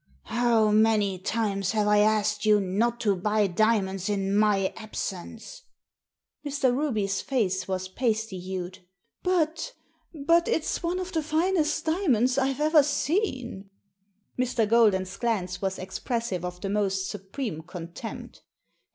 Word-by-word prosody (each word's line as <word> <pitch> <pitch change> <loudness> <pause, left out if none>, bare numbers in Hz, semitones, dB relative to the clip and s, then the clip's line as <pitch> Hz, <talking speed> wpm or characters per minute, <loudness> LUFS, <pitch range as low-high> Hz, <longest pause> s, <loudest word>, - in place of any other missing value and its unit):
" 70 0 -33 0.2
How 225 -3 +4
many 210 -3 +3
times 200 -1 -1
have 210 -1 +1
I 210 0 +4
asked 215 0 +2
you 210 -1 +5
not 215 +5 0
to 205 -4 +2
buy 210 +3 +1
diamonds 195 -1 +1
in 195 -1 0
my 205 -2 +2
absence! 220 - -6 0.4
" - - -62
Mr. 275 -4 +1
Ruby's 220 -9 0
face 200 -9 -1
was 185 -1 -2
pasty 220 -2 -1
hued. 185 0 -5 0.4
"But 355 +5 0 0.2
— - - -25
^but 335 0 +5
it's 320 - -1
one 350 +1 -1
of 370 0 -5
the 320 - 0
finest 315 0 0
diamonds 275 - +2
I've 270 +1 0
ever 310 0 +6
seen." 265 - -1 0.7
Mr. 245 -3 +1
Golden's 200 -4 +3
glance 185 -7 -1
was 190 -1 -1
expressive 190 0 -3
of 180 0 -6
the 195 - -3
most 195 -2 0
supreme 195 - -5
contempt. 170 0 -8
215 Hz, 140 wpm, -27 LUFS, 195-260 Hz, 0.7 s, ever